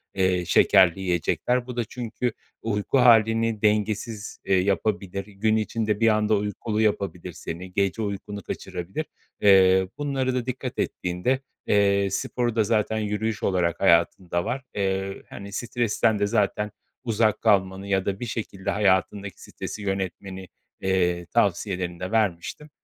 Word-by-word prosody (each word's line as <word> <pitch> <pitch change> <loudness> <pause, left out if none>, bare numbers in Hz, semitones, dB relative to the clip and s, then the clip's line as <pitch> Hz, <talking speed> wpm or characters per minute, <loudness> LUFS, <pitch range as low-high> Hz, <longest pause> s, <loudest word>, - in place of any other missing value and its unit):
eee, 90 -2 +1
şekerli 95 0 +5
yiyecekler. 95 +7 0
Bu 125 - -6
da 120 - +1
çünkü 120 0 -3 0.3
uyku 105 +4 0
halini 115 -2 +4
dengesiz, 105 0 -1
eee, 95 - +3
yapabilir, 100 0 -1
gün 105 +2 0
içinde 110 -1 -1
bir 115 - +4
anda 110 0 +3
uykulu 105 +2 -2
yapabilir 100 -4 -1
seni, 90 +2 -7
gece 100 +3 0
uykunu 100 0 -4
kaçırabilir. 95 - -5 0.4
Eee, 95 -2 +6
bunlara 135 -3 -1
da 125 -1 -1
dikkat 130 0 -4
ettiğinde, 90 +9 -1 0.3
eee, 100 -1 +3
sporu 120 -2 -1
da 110 - +3
zaten 110 0 +1
yürüyüş 105 +1 -2
olarak 85 -3 +1
hayatında 85 -1 +2
var. 130 +2 -2
Eee, 95 -1 -2
hani, 100 0 -9
stresten 115 -2 0
de 100 - +2
zaten 105 -1 0 0.3
uzak 110 -2 +1
kalmanı 95 -2 +2
ya 95 -1 +1
da 100 0 -2
bir - - -4
şekilde 105 -4 -4
hayatındaki 100 -1 0
stresi 105 - -7
yönetmeni, 95 -1 -4 0.3
eee, 90 -2 +1
tavsiyelerini 90 -2 0
de 90 +3 -4
vermiştim. 110 - -1
100 Hz, 135 wpm, -25 LUFS, 95-110 Hz, 0.4 s, Eee